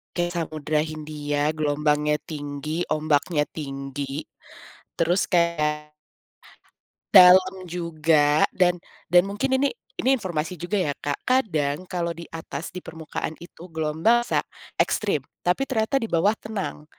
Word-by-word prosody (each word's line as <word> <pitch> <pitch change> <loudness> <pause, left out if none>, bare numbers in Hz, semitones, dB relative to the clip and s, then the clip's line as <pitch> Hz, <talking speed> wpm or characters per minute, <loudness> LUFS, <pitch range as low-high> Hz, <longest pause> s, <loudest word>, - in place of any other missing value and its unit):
ke 175 0 0
Samudra 155 -3 -2
Hindia 150 -1 -2
gelombangnya 150 0 +1
tinggi, 150 +2 -4
ombaknya 155 0 +1
tinggi. 140 0 -5 0.8
Terus 175 +4 +3
kayak, 150 -4 0 1.1
dalam 185 0 +7
juga 160 -3 +2
dan 180 -1 +3 0.3
dan 175 +1 +6
mungkin 260 +7 0
ini, 280 +1 +1 0.3
ini 260 - +1
informasi 180 -6 -3
juga 200 +4 -1
ya, 145 -6 0
Kak, 145 -1 -4
kadang 175 - +1
kalau 170 -2 -2
di 170 - -8
atas, 160 -1 -6
di 180 - -6
permukaan 160 -1 -5
itu 175 0 -12
gelombang 160 +10 +2
bisa - - +1 0.4
ekstrim, 175 -11 +1 0.2
tapi 180 +10 +2
ternyata 245 +1 0
di 230 - -1
bawah 185 +5 +2
tenang. 200 -8 -5
160 Hz, 125 wpm, -24 LUFS, 150-185 Hz, 1.1 s, dalam